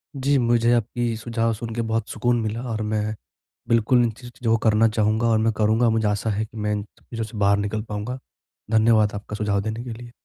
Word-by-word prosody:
जी, 140 +1 +2
मुझे 120 -1 +3
आपकी 120 0 0
सुझाव 115 0 -1
सुन 115 +1 -6
के 120 - 0
बहुत 115 0 -2
सुकून 120 0 +1
मिला 110 +2 -3
और 110 - -2
मैं, 105 0 -1 0.5
बिल्कुल 115 +2 +4
इन 115 - +1
चीजों 120 0 -5
को 115 - +4
करना 110 +1 +4
चाहूँगा 110 +1 +1
और 115 -1 +3
मैं 110 0 +2
करूँगा। 110 +2 +2
मुझे 110 -1 +1
आशा 105 +2 -1
है 110 +1 -1
कि 110 - -14
मैं 105 0 -1
इन 105 -1 -2 0.2
चीजों 115 -2 -6
से 110 0 -8
बाहर 100 0 +3
निकल 105 +1 -2
पाऊँगा। 105 +5 -4 0.5
धन्यवाद 110 -1 +4
आपका 105 +1 -6
सुझाव 105 -2 0
देने 110 +3 -4
के 120 - -6
लिए। 120 +1 -10
110 Hz, 215 wpm, -23 LUFS, 105-115 Hz, 0.5 s, बिल्कुल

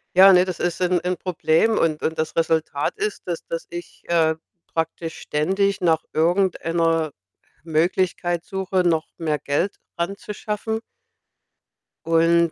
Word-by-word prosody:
Ja, 190 +1 +9
ne, 180 -1 +6
das 185 -2 -5
ist 175 -1 -1
'n 180 -1 +2
'n 180 0 -1
Problem. 180 +4 +2
Und 155 -2 +1
und 160 - -1
das 155 0 -2
Resultat 160 -3 0
ist, 425 - -3
dass 170 -2 -3
dass 165 - -4
ich, 175 0 -8
äh, 160 -2 +3 0.3
praktisch 165 0 -3
ständig 195 +7 0
nach 165 -3 +2
irgendeiner 165 -2 +1 0.5
Möglichkeit 175 +1 0
suche, 190 -1 -1
noch 165 -3 +1
mehr 155 -3 -1
Geld 150 +8 -1 0.2
ranzuschaffen. 210 +4 -3 1.3
Und 165 0 +4
170 Hz, 130 wpm, -23 LUFS, 160-185 Hz, 1.3 s, Ja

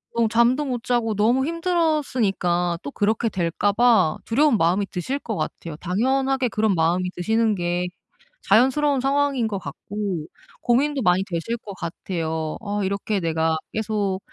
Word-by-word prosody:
좀 230 -1 +2
잠도 235 +5 +3
못 245 -4 -3
자고 235 -3 0
너무 235 +6 +3
힘들었으니까 260 - 0
또 140 - -5
그렇게 220 +6 0
될까 185 +1 0
봐 225 -7 +3
두려운 275 +1 +3
마음이 180 +5 +2
드실 225 +10 -2
것 225 -6 -5
같아요. 165 -4 -5
당연하게 260 +8 0
그런 215 -3 +1
마음이 175 +2 +1
드시는 220 +4 +1
게 175 0 -1 0.6
자연스러운 265 +5 +4
상황인 275 -3 +1
것 205 -2 -3
같고 185 +1 -5 0.3
고민도 275 +4 +1
많이 185 -2 +3
되실 190 +5 -3
것 210 -3 -9
같아요. 165 -2 -4
어 205 -1 -2
이렇게 200 +2 -1
내가 160 -1 0 0.2
계속 210 -3 -1
210 Hz, 320 characters per minute, -23 LUFS, 180-250 Hz, 0.6 s, 자연스러운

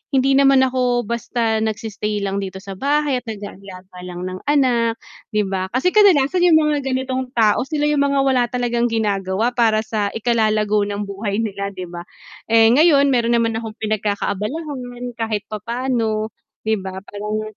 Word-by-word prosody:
hindi 270 +1 +3
naman 270 -1 +5
ako 250 -2 +1
basta 230 0 -1
nagsi-stay 215 -1 -3
lang 195 0 -1
dito 190 -1 -5
sa 195 - -8
bahay 285 0 +1
at 245 - -24
nag-aalaga 195 -3 -9
lang 180 0 -6
ng 185 0 -5
anak, 245 -5 +2 0.4
'di 210 -1 +2
ba. 190 -1 -2
Kasi 360 +8 +2
kadalasan 365 -6 +4
'yung 335 -3 +6
mga 300 -3 +2
ganitong 260 0 -2
tao, 225 +2 +3
sila 300 -2 -2
'yung 295 -1 +1
mga 280 -1 +2
wala 255 -3 +3
talagang 240 -1 -1
ginagawa 210 0 0
para 225 -3 +2
sa 215 -2 -1
ikalalago 215 -2 +1
ng 205 0 -3
buhay 200 +1 -4
nila 200 -2 -3
'di 185 -1 -6
ba? 175 0 -8 0.4
Eh, 225 0 +5
ngayon 280 0 +5
meron 235 -1 +2
naman 230 -1 +1
akong 220 -1 -7
pinagkakaabalahan 245 - -3
kahit 215 -3 -2
papaano, 225 -1 -2 0.3
'di 220 -1 0
ba, 190 0 -7
parang, 210 +1 -4
225 Hz, 160 wpm, -20 LUFS, 205-260 Hz, 0.4 s, yung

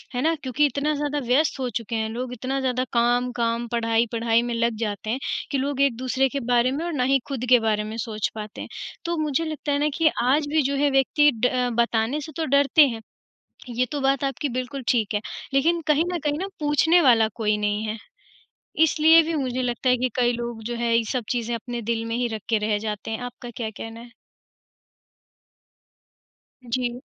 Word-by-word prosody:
है 245 - 0
ना? 320 +4 +2
क्योंकि 265 +3 +2
इतना 290 +2 0
ज़्यादा 290 0 -1
व्यस्त 275 +4 +2
हो 255 -1 -1
चुके 230 -1 -4
हैं 220 0 -1
लोग, 245 +2 -4
इतना 260 +3 -3
ज़्यादा 255 -1 0
काम-काम, 240 -1 +1
पढ़ाई-पढ़ाई 230 0 +1
में 240 0 -3
लग 230 0 +1
जाते 215 -1 -3
हैं 245 +4 -1 0.3
कि 280 - +1
लोग 275 +1 -1
एक-दूसरे 260 0 +1
के 280 - -3
बारे 245 +1 +3
में 290 +5 -3
और 345 - -3
ना 260 -4 0
ही 270 - +4
खुद 265 -4 -3
के 250 -1 +7
बारे 215 -2 0
में 215 +1 -6
सोच 220 -2 -2
पाते 215 -1 -7
हैं। - - -8 0.4
तो 340 0 -1
मुझे 310 0 0
लगता 310 -2 -3
है 285 - +2
ना 300 +1 +2
कि 325 +2 +2 0.2
आज 280 +5 +3
भी 310 +2 +2
जो 280 +1 0
है 285 +1 +2
व्यक्ति 270 +2 +4 0.2
ड - - +5 0.3
बताने 235 +4 0
से 315 - -8
तो 325 - -1
डरते 280 +1 +4
हैं, 230 -3 -5 0.7
ये 245 +1 0
तो 290 - -2
बात 275 0 +1
आपकी 275 +2 -2
बिल्कुल 255 +2 -4
ठीक 220 -4 +1
है, 205 - +1 0.3
लेकिन 330 +5 +3
कहीं 305 +1 +3
न 350 - -1
कहीं 295 0 0
ना 380 - -2
पूछने 300 +4 +4
वाला 230 -6 +5
कोई 215 -2 +1
नहीं 210 0 -1
है। 215 +1 -3 0.9
इसलिए 320 +1 +6
भी 325 +1 -2
मुझे 255 -3 -1
लगता 250 +1 -1
है 250 - +4
कि 255 +1 0
कई 245 -1 +3
लोग 235 -1 -5
जो 240 +2 -4
है, 235 0 +1
ये 230 - +1
सब 255 -2 -1
चीज़ें 240 -1 -1
अपने 240 +1 -5
दिल 225 0 -1
में 230 0 -3
ही 245 0 0
रख 215 - -7
के 225 - +3
रह 210 -1 +1
जाते 210 0 -5
हैं। 220 - -3
आपका 245 0 -8
क्या 225 -2 -3
कहना 225 +2 -8
है? 235 0 -13 2.6
जी। 245 0 -2
250 Hz, 210 wpm, -24 LUFS, 230-280 Hz, 2.6 s, के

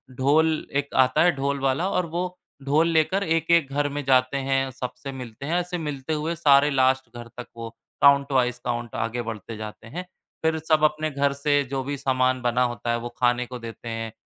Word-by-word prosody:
ढोल 155 +5 +2
एक 140 0 -1
आता 130 0 +1
है, 180 - +5
ढोल 140 +1 -1
वाला, 135 +8 0
और 180 - 0
वो 180 +2 -4 0.3
ढोल 150 +4 +3
लेकर 165 +5 +2
एक-एक 165 -3 +2
घर 145 0 +1
में 145 +1 -4
जाते 130 0 +3
हैं, 135 0 +1
सबसे 130 +2 -6
मिलते 125 -1 -8
हैं, 170 +4 +1
ऐसे 180 0 -3
मिलते 150 -2 -4
हुए 155 +2 -2
सारे 145 -2 +5
लास्ट 130 -1 +2
घर 120 - -8
तक 125 - -7
वो 115 0 -6 0.3
काउंट 140 0 +5
वाइज़ 125 -2 +1
काउंट 120 -1 -3
आगे 120 +2 -3
बढ़ते 115 -1 -6
जाते 110 +1 -8
हैं। 175 +10 -6 0.4
फिर 160 0 +2
सब 155 0 +1
अपने 155 +1 +2
घर 140 0 +1
से 145 0 +1
जो 135 -1 -1
भी 140 +2 -4
सामान 130 -1 +1
बना 125 +1 +2
होता 120 -1 -2
है, 120 - +1
वो 120 +1 -5
खाने 125 0 +2
को 125 0 -8
देते 115 0 -8
हैं। 115 -1 -4
140 Hz, 205 wpm, -24 LUFS, 125-155 Hz, 0.4 s, है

